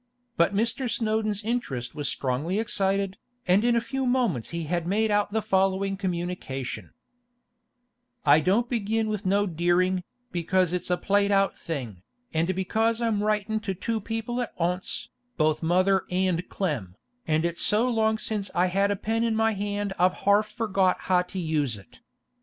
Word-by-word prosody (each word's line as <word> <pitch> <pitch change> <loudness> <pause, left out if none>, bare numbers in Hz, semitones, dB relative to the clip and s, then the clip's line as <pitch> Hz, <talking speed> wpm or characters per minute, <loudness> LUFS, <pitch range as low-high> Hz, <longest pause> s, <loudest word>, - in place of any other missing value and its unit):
But 170 +4 +2
Mr. 235 +4 0
Snowdon's 215 -2 0
interest 150 - -2
was 145 -3 -2
strongly 145 +8 -1
excited, 195 -3 0 0.3
and 185 +4 +4
in 240 0 +3
a - - +4
few 265 +3 -2
moments 235 - +1
he 170 0 -3
had 170 +2 -2
made 215 +3 +1
out 205 0 +2
the 220 0 0
following 195 -1 +1
communication: 175 -8 -4 1.3
'I 145 +1 +7
don't 195 +10 +2
begin 225 -2 0
with 210 -3 -3
no 200 +2 +3
deering, 180 +1 +1 0.3
because 180 +1 +1
it's 180 - -3
a 180 - +2
plaid 200 +1 +2
out 195 -1 +3
thing, 125 - -5 0.3
and 165 +3 +1
because 220 +5 +1
I'm 225 -3 0
riting 215 +1 0
to 200 -3 -3
too 225 +4 -2
people 225 +3 -3
at 240 - -6
onse, 180 +2 -2 0.3
both 155 -2 +2
mother 185 +3 +2
and 180 -1 0
Clem, 130 - -3 0.3
and 160 +1 +2
it's 170 0 -2
so 215 +4 +3
long 220 -2 +2
since 210 -3 -3
I've 180 +1 +2
had 195 +2 +2
a 205 - +1
pen 225 +3 -1
in 230 -1 +1
my 225 0 +3
hand 205 -1 -2
I've 180 +1 +4
harf 205 +1 +4
forgot 195 -4 +1
how 180 -1 +3
to 180 +1 -8
use 150 - 0
it. 100 - -17
195 Hz, 170 wpm, -26 LUFS, 175-220 Hz, 1.3 s, I